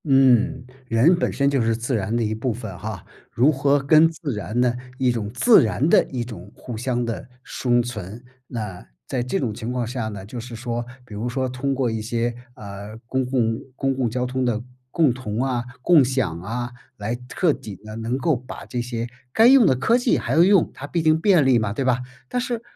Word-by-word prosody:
嗯， 135 -1 +4 0.2
人 125 +10 +4
本 175 - 0
身 140 - +1
就 140 -2 +2
是 115 0 +1
自 120 +2 -2
然 105 +1 -1
的 120 - +1
一 110 0 -1
部 115 +3 -2
分 110 -4 -6
哈， 105 -2 -6 0.3
如 130 +6 +4
何 140 0 +2
跟 155 +4 +5
自 160 -4 -5
然 105 +2 -3
的 125 -1 +2 0.2
一 130 -2 +2
种 110 -4 -3
自 220 - +6
然 110 +6 0
地 - - +6
一 125 -3 -3
种 110 -4 -10
互 120 - -7
相 120 +1 -1
地 115 -5 -5 0.2
生 120 -1 +1
存， 110 -1 -7 0.2
那 105 -7 -6 0.2
在 130 - -2
这 125 +10 -1
种 120 -5 -1
情 115 +2 -5
况 125 -1 -1
下 120 -1 -3
呢， 100 -3 -7
就 120 +4 -7
是 120 0 -8
说 120 +1 -3 0.2
比 115 - -12
如 110 +4 -3
说 130 +1 -1
通 130 +2 -2
过 125 -3 0
一 110 -1 -3
些， 115 +2 -1 0.2
啊， 100 +1 -8
公 130 +2 -1
共 120 -3 0 0.2
公 135 0 0
共 130 -3 0
交 125 +2 -1
通 130 +1 -2
的 120 -2 0 0.3
共 150 -3 +3
同 120 -2 -3
啊， 125 -3 -1 0.2
共 165 -3 +6
享 125 -10 -1
啊， 120 +5 -4 0.3
来 105 +3 -2
彻 170 -1 +2
底 105 -6 -8
地 110 +3 -10
能 115 +3 -2
够 150 +3 +1
把 125 +1 -8
这 120 - -3
些 120 -1 -4 0.2
该 225 - +5
用 255 -2 +7
的 130 - +4
科 225 - +2
技 245 -1 +2
还 120 - -2
要 160 - +5
用， 195 -2 +4
它 145 - -8
毕 170 +2 -1
竟 155 0 +3
便 180 -8 +4
利 130 -3 +5
嘛， 105 -2 -1
对 135 +4 -2
吧？ 125 -1 +2 0.3
但 250 - -1
是 240 0 -2
每 225 - -8
125 Hz, 240 characters per minute, -23 LUFS, 115-135 Hz, 0.3 s, 用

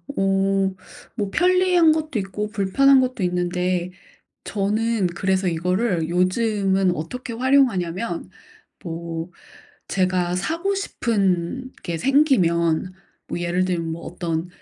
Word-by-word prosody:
어 195 0 +1 0.4
뭐 205 -4 -2
편리한 360 - +4
것도 310 -4 -1
있고 195 +2 -4
불편한 260 +7 +4
것도 255 -5 -2
있는데 180 0 -1 0.5
저는 215 0 0
그래서 190 +1 0
이거를 180 +1 0
요즘은 190 0 +1
어떻게 235 - -6
활용하냐면 225 - +1 0.6
뭐 165 0 -5 0.6
제가 180 -2 0
사고 335 - -1
싶은 225 - -1
게 170 -1 -3
생기면 185 - +2 0.4
뭐 - - -3
예를 175 +1 0
들면 170 -3 -2
뭐 165 - -7
어떤 165 -1 -3
190 Hz, 225 characters per minute, -22 LUFS, 175-235 Hz, 0.6 s, 편리한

